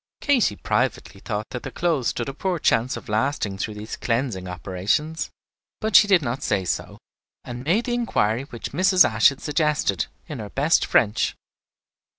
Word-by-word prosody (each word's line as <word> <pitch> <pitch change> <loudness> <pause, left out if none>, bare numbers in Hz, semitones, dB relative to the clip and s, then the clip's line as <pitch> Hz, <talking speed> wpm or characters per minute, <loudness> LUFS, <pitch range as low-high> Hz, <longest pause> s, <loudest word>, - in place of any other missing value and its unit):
Katy 255 - +2
privately 95 -1 -2
thought 105 -1 -4
that 125 - -5
the - - -6
clothes 160 -8 0
stood 120 - -2
a 135 - -4
poor 180 +5 -2
chance 125 -2 +1
of - - -10
lasting 105 -3 -1
through 105 +2 -3
these 105 +1 -6
cleansing 115 -6 -2
operations; 95 - -2 0.5
but 220 -1 -1
she 210 - +8
did 190 -6 +4
not 125 +1 -3
say 100 -3 0
so, - - -3 0.5
and 120 0 -7
made 185 - +1
the 245 - -1
inquiry 130 - 0
which 120 -4 -7
Mrs. 185 +4 +5
Ashe 110 -1 +5
had 140 - -9
suggested, 150 0 0 0.2
in 150 -6 -7
her 105 -2 -6
best 150 +8 +2
French. 110 -1 +2
130 Hz, 170 wpm, -23 LUFS, 105-160 Hz, 0.5 s, she